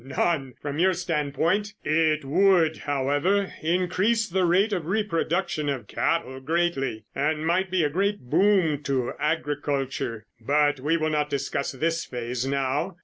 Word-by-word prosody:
"None, 135 Hz, 0 st, -1 dB
from 145 Hz, +1 st, -4 dB
your 185 Hz, +2 st, +4 dB
standpoint. 170 Hz, +5 st, -1 dB
It 155 Hz, -1 st, +1 dB
would, 170 Hz, +1 st, +3 dB
however, 145 Hz, +8 st, 0 dB
increase 185 Hz, +7 st, +1 dB
the 185 Hz, +1 st, +1 dB
rate 195 Hz, +5 st, +3 dB
of 170 Hz, -5 st, -2 dB
reproduction 175 Hz, -5 st, -1 dB
of 130 Hz, -6 st, -3 dB
cattle 130 Hz, +1 st, -1 dB
greatly 135 Hz, -7 st, -1 dB
and 155 Hz, +2 st, -1 dB
might 185 Hz, +3 st, +1 dB
be 180 Hz, -2 st, +1 dB
a 150 Hz, -, +2 dB
great 200 Hz, +5 st, 0 dB
boom 165 Hz, +1 st, +2 dB
to 135 Hz, -4 st, -1 dB
agriculture, 145 Hz, -6 st, -2 dB
but 145 Hz, +3 st, +2 dB
we 150 Hz, +5 st, +1 dB
will 155 Hz, -1 st, -1 dB
not 150 Hz, -1 st, 0 dB
discuss 140 Hz, 0 st, -2 dB
this 165 Hz, +4 st, -1 dB
phase 125 Hz, +1 st, -4 dB
now. 140 Hz, +6 st, -1 dB
155 Hz, 145 wpm, -25 LUFS, 140-180 Hz, -, your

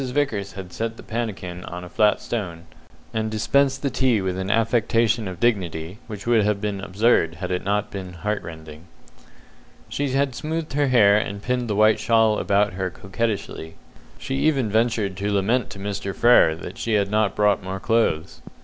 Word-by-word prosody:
Vickers 125 Hz, -7 st, -1 dB
had 95 Hz, -2 st, -9 dB
set 115 Hz, 0 st, -3 dB
the -, -, -11 dB
pannikin 100 Hz, -6 st, -4 dB
on 90 Hz, +1 st, -7 dB
a -, -, -8 dB
flat 105 Hz, +3 st, +2 dB
stone, 90 Hz, -8 st, -5 dB, 0.5 s
and 110 Hz, 0 st, -1 dB
dispensed 135 Hz, +5 st, +1 dB
the 140 Hz, -, 0 dB
tea 125 Hz, -4 st, +2 dB
with 95 Hz, -1 st, -2 dB
an 95 Hz, +1 st, -3 dB
affectation 115 Hz, 0 st, +2 dB
of 90 Hz, -1 st, -7 dB
dignity 95 Hz, -5 st, -1 dB
which 105 Hz, -4 st, -8 dB
would 115 Hz, -2 st, +3 dB
have 105 Hz, -1 st, +1 dB
been 100 Hz, -2 st, -3 dB
absurd 95 Hz, -4 st, +2 dB
had 90 Hz, +2 st, -5 dB
it 90 Hz, -, -1 dB
not 105 Hz, +1 st, -1 dB
been 95 Hz, -2 st, -6 dB
heart 105 Hz, +5 st, -2 dB
rending. 80 Hz, -1 st, -10 dB, 1.0 s
She 145 Hz, -1 st, -2 dB
had 135 Hz, 0 st, +1 dB
smoothed 160 Hz, +4 st, -4 dB
her 145 Hz, 0 st, +2 dB
hair 105 Hz, -6 st, +5 dB
and 100 Hz, -1 st, -2 dB
pinned 125 Hz, 0 st, -1 dB
the 105 Hz, -, -1 dB
white 110 Hz, +1 st, +4 dB
shawl 110 Hz, -2 st, +3 dB
about 100 Hz, 0 st, +2 dB
her 95 Hz, 0 st, -2 dB
coquettishly; 95 Hz, -4 st, -4 dB, 0.4 s
she -, -, -5 dB
even 135 Hz, -7 st, +1 dB
ventured 110 Hz, -3 st, +1 dB
to 100 Hz, +1 st, -2 dB
lament 105 Hz, +5 st, +1 dB
to -, -, -9 dB
Mr. 100 Hz, 0 st, -4 dB
Frere 120 Hz, -9 st, +5 dB
that 90 Hz, +6 st, -9 dB
she 115 Hz, -, -1 dB
had 100 Hz, -1 st, +1 dB
not 110 Hz, -1 st, +1 dB
brought 105 Hz, -1 st, +2 dB
more 95 Hz, +1 st, -5 dB
clothes. 105 Hz, -8 st, 0 dB
105 Hz, 185 wpm, -23 LUFS, 95-115 Hz, 1.0 s, hair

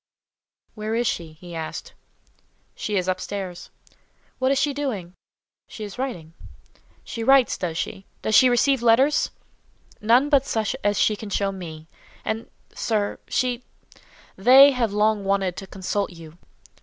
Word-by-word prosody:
"Where 215 Hz, +1 st, -3 dB
is 240 Hz, +1 st, +1 dB
she?" 165 Hz, -7 st, -2 dB
he 175 Hz, +2 st, -12 dB
asked. 160 Hz, -1 st, -6 dB, 0.8 s
"She 210 Hz, -1 st, -2 dB
is 185 Hz, -1 st, -1 dB
up 185 Hz, 0 st, -1 dB
stairs." 185 Hz, -3 st, -6 dB, 0.7 s
"What 260 Hz, +1 st, +2 dB
is 275 Hz, -, +2 dB
she 285 Hz, +1 st, +1 dB
doing?" 225 Hz, -12 st, -4 dB, 0.5 s
"She 215 Hz, -, -8 dB
is 205 Hz, +3 st, -8 dB
writing." 175 Hz, -12 st, -4 dB, 0.7 s
"She 230 Hz, -, -5 dB
writes, 270 Hz, -1 st, +5 dB
does 165 Hz, -3 st, -4 dB
she? 195 Hz, -, -5 dB, 0.2 s
Does 215 Hz, -, -1 dB
she 255 Hz, +4 st, +7 dB
receive 250 Hz, +2 st, +3 dB
letters?" 250 Hz, +6 st, +4 dB, 0.7 s
"None 240 Hz, +6 st, +4 dB
but 275 Hz, -2 st, +3 dB
such 220 Hz, +2 st, -1 dB
as 205 Hz, -1 st, +1 dB
she 215 Hz, -, +3 dB
can 210 Hz, 0 st, -8 dB
show 200 Hz, 0 st, 0 dB
me. 160 Hz, -4 st, -9 dB, 0.4 s
And—sir—she—they 240 Hz, +3 st, +1 dB
have 240 Hz, -5 st, 0 dB
long 210 Hz, 0 st, +2 dB
wanted 195 Hz, -2 st, 0 dB
to 195 Hz, -, -7 dB
consult 195 Hz, +2 st, -2 dB
you." 165 Hz, -1 st, -13 dB
210 Hz, 140 wpm, -24 LUFS, 185-250 Hz, 0.8 s, she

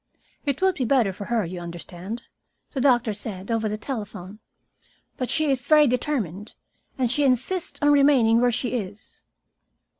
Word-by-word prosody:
"It 280 Hz, +5 st, -1 dB
would 380 Hz, 0 st, +4 dB
be 280 Hz, -, -2 dB
better 230 Hz, -6 st, +2 dB
for 200 Hz, -, -7 dB
her, 230 Hz, -3 st, 0 dB
you 180 Hz, +2 st, -6 dB
understand," 175 Hz, +5 st, -7 dB, 0.5 s
the 270 Hz, -, -2 dB
doctor 240 Hz, -5 st, +3 dB
said, 200 Hz, 0 st, -6 dB
over 225 Hz, -1 st, 0 dB
the 210 Hz, -, -3 dB
telephone. 210 Hz, -5 st, -6 dB, 0.8 s
"But 255 Hz, -, -3 dB
she 310 Hz, -3 st, +2 dB
is 255 Hz, -2 st, -1 dB
very 305 Hz, -1 st, +6 dB
determined, 235 Hz, -, -2 dB, 0.4 s
and 250 Hz, -3 st, +1 dB
she 290 Hz, +2 st, +2 dB
insists 275 Hz, +8 st, 0 dB
on 290 Hz, -, +5 dB
remaining 270 Hz, -6 st, +5 dB
where 245 Hz, 0 st, +3 dB
she 245 Hz, +1 st, -1 dB
is." 210 Hz, -3 st, -6 dB
235 Hz, 160 wpm, -24 LUFS, 205-275 Hz, 0.8 s, very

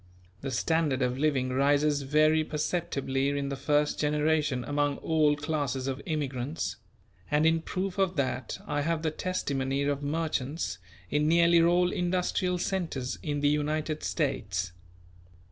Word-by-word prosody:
The 135 Hz, -, -3 dB
standard 140 Hz, +1 st, +1 dB
of 125 Hz, +1 st, -1 dB
living 140 Hz, -4 st, +1 dB
rises 145 Hz, +2 st, +2 dB
very 155 Hz, +3 st, +3 dB
perceptibly 140 Hz, -4 st, -1 dB
in 140 Hz, -1 st, -1 dB
the 140 Hz, -, -2 dB
first 145 Hz, +2 st, +1 dB
generation 150 Hz, -3 st, +1 dB
among 145 Hz, +2 st, 0 dB
all 155 Hz, -2 st, +2 dB
classes 145 Hz, -3 st, -2 dB
of 135 Hz, +1 st, -3 dB
immigrants; 145 Hz, -2 st, -2 dB, 0.5 s
and 150 Hz, +1 st, +3 dB
in 165 Hz, 0 st, +3 dB
proof 185 Hz, +3 st, -3 dB
of 190 Hz, -2 st, +2 dB
that 130 Hz, -4 st, -2 dB
I 145 Hz, -, -1 dB
have 165 Hz, +1 st, -1 dB
the 160 Hz, -, +1 dB
testimony 140 Hz, -6 st, -1 dB
of 145 Hz, 0 st, 0 dB
merchants 145 Hz, -, -2 dB, 0.3 s
in 150 Hz, +1 st, +2 dB
nearly 170 Hz, +1 st, +5 dB
all 175 Hz, +1 st, +3 dB
industrial 180 Hz, 0 st, 0 dB
centres 170 Hz, -9 st, -2 dB
in 145 Hz, -2 st, -2 dB
the 145 Hz, -, +4 dB
United 150 Hz, +1 st, -1 dB
States. 100 Hz, -, -1 dB
150 Hz, 140 wpm, -29 LUFS, 135-160 Hz, 0.5 s, nearly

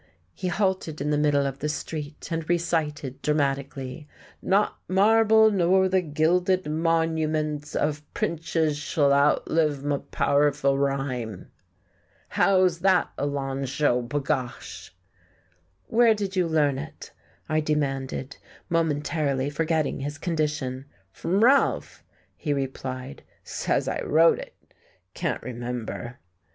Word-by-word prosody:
He 185 Hz, -, -4 dB
halted 185 Hz, -4 st, -1 dB
in 145 Hz, +2 st, -1 dB
the 150 Hz, -, +2 dB
middle 145 Hz, -1 st, +2 dB
of 135 Hz, 0 st, -4 dB
the 150 Hz, -, -2 dB
street 150 Hz, 0 st, -5 dB
and 165 Hz, -1 st, -3 dB
recited 155 Hz, -6 st, -1 dB
dramatically: 140 Hz, -1 st, -2 dB, 0.3 s
"'Not 200 Hz, +2 st, +1 dB
marble, 220 Hz, +3 st, +5 dB
nor 190 Hz, 0 st, +3 dB
th' 180 Hz, -4 st, 0 dB
gilded 180 Hz, +4 st, +2 dB
monuments 155 Hz, -2 st, 0 dB
Of 150 Hz, 0 st, -2 dB
prinches 160 Hz, -2 st, -1 dB
sh'll 145 Hz, -1 st, +2 dB
outlive 145 Hz, 0 st, +2 dB
m' 145 Hz, -1 st, 0 dB
powerful 140 Hz, -1 st, +2 dB
rhyme.'" 135 Hz, -7 st, -2 dB, 0.8 s
"How's 185 Hz, -3 st, +3 dB
that, 185 Hz, 0 st, +3 dB
Alonzho, 135 Hz, -2 st, 0 dB
b'gosh?" 135 Hz, -2 st, -3 dB, 1.0 s
"Where 230 Hz, -1 st, +4 dB
did 200 Hz, -2 st, -4 dB
you 180 Hz, -2 st, +2 dB
learn 145 Hz, -4 st, +2 dB
it?" 155 Hz, +3 st, -9 dB, 0.4 s
I 155 Hz, 0 st, +1 dB
demanded, 140 Hz, -3 st, -2 dB, 0.3 s
momentarily 145 Hz, -4 st, 0 dB
forgetting 160 Hz, -1 st, 0 dB
his 145 Hz, +1 st, -4 dB
condition. 145 Hz, -5 st, -2 dB, 0.3 s
"Fr'm 175 Hz, -, 0 dB
Ralph," 270 Hz, +4 st, +2 dB, 0.3 s
he 150 Hz, -, -2 dB
replied, 130 Hz, -1 st, -5 dB, 0.2 s
"says -, -, -1 dB
I -, -, -2 dB
wrote 165 Hz, +2 st, +4 dB
it. -, -, -10 dB, 0.6 s
Can't -, -, -3 dB
remember...." 120 Hz, 0 st, -5 dB
150 Hz, 110 wpm, -25 LUFS, 140-165 Hz, 1.0 s, marble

